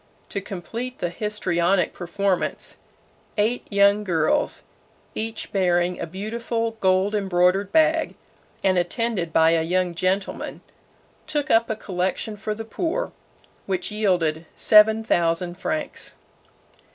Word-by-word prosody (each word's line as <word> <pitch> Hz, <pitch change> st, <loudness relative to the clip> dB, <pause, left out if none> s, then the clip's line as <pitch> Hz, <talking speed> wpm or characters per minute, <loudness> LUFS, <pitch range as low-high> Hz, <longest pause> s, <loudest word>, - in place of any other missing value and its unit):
To 200 Hz, -, -3 dB
complete 230 Hz, +7 st, -6 dB
the 175 Hz, -, -2 dB
histrionic 185 Hz, -3 st, 0 dB
performance, 185 Hz, +2 st, -2 dB, 0.6 s
eight 220 Hz, +4 st, +1 dB
young 200 Hz, +1 st, +4 dB
girls, 165 Hz, -5 st, +1 dB, 0.5 s
each 220 Hz, 0 st, -4 dB
bearing 180 Hz, -2 st, +1 dB
a -, -, -3 dB
beautiful 230 Hz, +5 st, -3 dB
gold 190 Hz, +2 st, +2 dB
embroidered 190 Hz, -1 st, +2 dB
bag, 320 Hz, 0 st, +3 dB, 0.5 s
and 190 Hz, -2 st, +3 dB
attended 180 Hz, -1 st, -1 dB
by 160 Hz, +1 st, +5 dB
a 165 Hz, -1 st, +3 dB
young 180 Hz, +2 st, 0 dB
gentleman, 185 Hz, +3 st, -2 dB, 0.7 s
"took 300 Hz, -1 st, -1 dB
up 230 Hz, +1 st, +4 dB
a 220 Hz, -, 0 dB
collection" 190 Hz, +1 st, -2 dB
for 210 Hz, +1 st, -4 dB
the 225 Hz, +1 st, -6 dB
poor, 340 Hz, -, -2 dB, 0.6 s
which 190 Hz, +2 st, -2 dB
yielded 175 Hz, -7 st, 0 dB
seven 220 Hz, +1 st, +6 dB
thousand 175 Hz, -2 st, 0 dB
francs. 310 Hz, 0 st, -3 dB
195 Hz, 115 wpm, -24 LUFS, 175-220 Hz, 0.7 s, seven